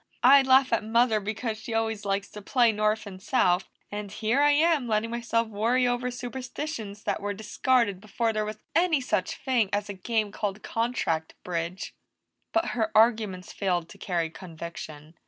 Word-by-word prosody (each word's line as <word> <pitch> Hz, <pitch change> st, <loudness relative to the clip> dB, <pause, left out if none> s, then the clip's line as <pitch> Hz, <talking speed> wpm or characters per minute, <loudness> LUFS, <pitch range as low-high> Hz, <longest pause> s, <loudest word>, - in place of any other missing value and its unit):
"I 275 Hz, +3 st, +8 dB
laugh 260 Hz, -1 st, +4 dB
at 225 Hz, -, +2 dB
Mother 225 Hz, 0 st, +3 dB
because 220 Hz, +2 st, -3 dB
she 225 Hz, 0 st, -5 dB
always 225 Hz, -2 st, -1 dB
likes 195 Hz, 0 st, -1 dB
to 210 Hz, -, -9 dB
play 240 Hz, +2 st, +3 dB
North 215 Hz, +1 st, 0 dB
and 190 Hz, -2 st, -9 dB
South, 185 Hz, -6 st, +2 dB, 0.2 s
and 205 Hz, -1 st, -5 dB
here 225 Hz, +7 st, +1 dB
I'm 290 Hz, -1 st, +4 dB
letting 220 Hz, +1 st, 0 dB
myself 235 Hz, -1 st, 0 dB
worry 230 Hz, +4 st, +1 dB
over 245 Hz, +1 st, 0 dB
superstitions 245 Hz, -3 st, -6 dB
that -, -, -1 dB
were 205 Hz, 0 st, -2 dB
discarded 220 Hz, -1 st, +1 dB
before 225 Hz, +2 st, -1 dB
there 215 Hz, 0 st, 0 dB
was 215 Hz, 0 st, -5 dB, 0.2 s
any 330 Hz, -2 st, +3 dB
such 260 Hz, -, -1 dB
thing 245 Hz, -7 st, +1 dB
as 205 Hz, 0 st, -1 dB
a -, -, -3 dB
game 215 Hz, +2 st, -1 dB
called 205 Hz, -1 st, -3 dB
contract 225 Hz, -9 st, -1 dB
bridge." 175 Hz, +2 st, -4 dB, 0.6 s
But 335 Hz, -, +1 dB
her 220 Hz, -3 st, -1 dB
arguments 215 Hz, -5 st, +2 dB
failed 175 Hz, -4 st, -1 dB
to 200 Hz, -, -14 dB
carry 170 Hz, -4 st, -1 dB
conviction. 160 Hz, -3 st, -9 dB
220 Hz, 170 wpm, -27 LUFS, 200-245 Hz, 0.6 s, I